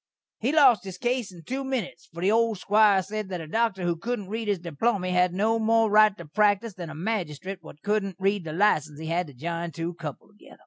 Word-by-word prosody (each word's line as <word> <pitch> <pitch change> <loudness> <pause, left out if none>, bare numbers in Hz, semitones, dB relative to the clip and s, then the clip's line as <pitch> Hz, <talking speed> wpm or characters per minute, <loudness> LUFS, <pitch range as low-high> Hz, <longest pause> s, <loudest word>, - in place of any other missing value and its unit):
He 245 +5 0
lost 275 -7 +5
his 190 -2 -7
case 240 -1 -1
in 175 -2 -13
two 265 +6 -3
minits, 245 -10 -4
for 170 +1 -8
the 195 - +3
old 225 -1 +2
squire 205 0 +4
sed 210 +1 -5
that 180 -2 -4
a 165 - -6
dokter 210 +2 0
who 175 -1 +1
couldn't 205 +2 -4
read 220 +1 -4
his 205 -2 +1
diplomy 180 +3 -1
had 180 0 +3
no 220 +5 +1
more 225 -1 +3
right 210 -1 +5
to 170 - -9
praktise 205 +6 +1
than 175 -3 -7
a 155 - -8
magistrate 185 -1 -3
what 155 -2 -14
couldn't 205 -2 0
read 195 0 0
the 160 - -6
license 155 -6 +1
had 170 +1 0
to 145 - -13
jine 170 +5 -4
two 165 +3 -4
cuple 155 +2 -8
together. 210 - -17
195 Hz, 225 wpm, -26 LUFS, 170-220 Hz, -, lost